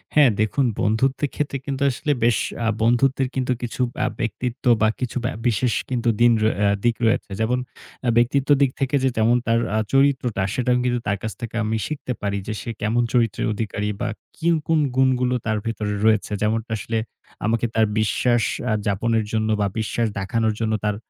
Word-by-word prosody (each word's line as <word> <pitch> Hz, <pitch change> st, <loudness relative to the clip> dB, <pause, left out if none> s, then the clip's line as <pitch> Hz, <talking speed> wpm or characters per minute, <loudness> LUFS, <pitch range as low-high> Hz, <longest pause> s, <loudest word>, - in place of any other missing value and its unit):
হ্যাঁ 145 Hz, -6 st, +6 dB
দেখুন 120 Hz, +6 st, +1 dB, 0.2 s
বন্ধুত্বের 130 Hz, +6 st, +1 dB
ক্ষেত্রে 145 Hz, -2 st, -2 dB
কিন্তু 140 Hz, -1 st, -4 dB
আসলে 140 Hz, +4 st, -2 dB
বেশ 120 Hz, -1 st, +4 dB, 0.3 s
আ -, -, +1 dB
বন্ধুত্বের 130 Hz, +3 st, +2 dB
কিন্তু 130 Hz, -1 st, 0 dB
কিছু 120 Hz, +1 st, -4 dB, 0.2 s
আ -, -, +2 dB
ব্যক্তিত্ব 120 Hz, +4 st, -3 dB, 0.2 s
বা 110 Hz, -, +5 dB
কিছু 125 Hz, 0 st, -3 dB
ব্যা 130 Hz, -, -1 dB
বিশেষ 120 Hz, +1 st, +1 dB, 0.5 s
দিন 120 Hz, 0 st, +7 dB, 0.3 s
আ -, -, +4 dB, 0.2 s
দিক 120 Hz, -1 st, +3 dB
রয়েছে। 115 Hz, +1 st, +1 dB
যেমন 120 Hz, +3 st, +1 dB, 0.5 s
আ -, -, +4 dB
ব্যক্তিত্বের 135 Hz, +4 st, +3 dB
দিক 135 Hz, -2 st, +4 dB
থেকে 135 Hz, +1 st, 0 dB
যে 135 Hz, -, +4 dB
যেমন 115 Hz, +2 st, +4 dB
তার 115 Hz, 0 st, +3 dB, 0.2 s
আ -, -, +2 dB
চরিত্রটা 135 Hz, -6 st, +2 dB
সেটাও 125 Hz, 0 st, +1 dB
কিন্তু 120 Hz, -1 st, +1 dB
তার 100 Hz, -, +1 dB
কাছ 110 Hz, -, -2 dB
থেকে 115 Hz, -1 st, -6 dB
আমি 110 Hz, +1 st, 0 dB
শিখতে 145 Hz, -4 st, -4 dB
পারি 100 Hz, -1 st, -1 dB
যে 110 Hz, -, -2 dB
সে 115 Hz, -, -7 dB
কেমন 115 Hz, +3 st, +1 dB
চরিত্রের 115 Hz, -4 st, +1 dB
অধিকারী? 105 Hz, -1 st, -3 dB
বা 120 Hz, -, 0 dB, 0.3 s
কি 170 Hz, -, -3 dB, 0.2 s
কোন 160 Hz, -1 st, +3 dB, 0.2 s
গুণগুলো 125 Hz, -1 st, +2 dB
তার 110 Hz, -1 st, 0 dB
ভেতরে 105 Hz, -2 st, -2 dB
রয়েছে। 110 Hz, -1 st, +2 dB
যেমনটা 110 Hz, +2 st, -1 dB
আসলে, 115 Hz, +1 st, -3 dB, 0.5 s
আমাকে 115 Hz, +1 st, +1 dB
তার 110 Hz, -1 st, +4 dB
বিশ্বাস 115 Hz, +2 st, +2 dB, 0.3 s
আ -, -, +2 dB
যাপনের 110 Hz, +3 st, +1 dB
জন্য 110 Hz, -1 st, 0 dB
বা 100 Hz, -, +2 dB
বিশ্বাস 115 Hz, +1 st, 0 dB
দেখানোর 110 Hz, +3 st, 0 dB
জন্য 110 Hz, -1 st, 0 dB
তার 105 Hz, -1 st, +1 dB
115 Hz, 180 wpm, -22 LUFS, 110-130 Hz, 0.5 s, দিন